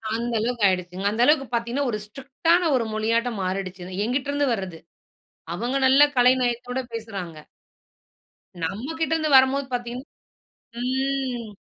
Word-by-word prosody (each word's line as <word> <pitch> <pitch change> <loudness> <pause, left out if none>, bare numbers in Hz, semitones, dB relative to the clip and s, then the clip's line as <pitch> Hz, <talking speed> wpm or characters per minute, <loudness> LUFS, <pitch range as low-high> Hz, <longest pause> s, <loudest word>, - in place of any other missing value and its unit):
அந்த 235 +1 -2
அளவுக்கு 235 0 -1
ஆயிடுச்சுங்க. 180 0 -2
அந்த 220 +3 -1
அளவுக்கு 295 -1 +4
பாத்தீங்கன்னா, 235 +4 -1
ஒரு 215 - -2
ஸ்ட்ரிக்டான 285 +9 0
ஒரு 240 -3 +1
மொழியாட்ட 230 +2 +1
மாறிடுச்சு. 185 -1 -4 0.2
என்கிட்டருந்து 285 +4 0
வர்றது 190 -6 -5 0.8
அவங்க 240 +7 -2
நல்ல 265 +2 +7
கலைநயத்தோட 245 0 +2
பேசுறாங்க. 200 -8 -6 1.3
நம்ம 200 +8 -3
கிட்ட 320 -1 0
இருந்து 310 -2 0
வரம்போது 265 +1 +3
பாத்தீங்கன்னா 245 +1 -4 0.8
ம், 260 -2 -2
245 Hz, 120 wpm, -24 LUFS, 215-270 Hz, 1.3 s, நல்ல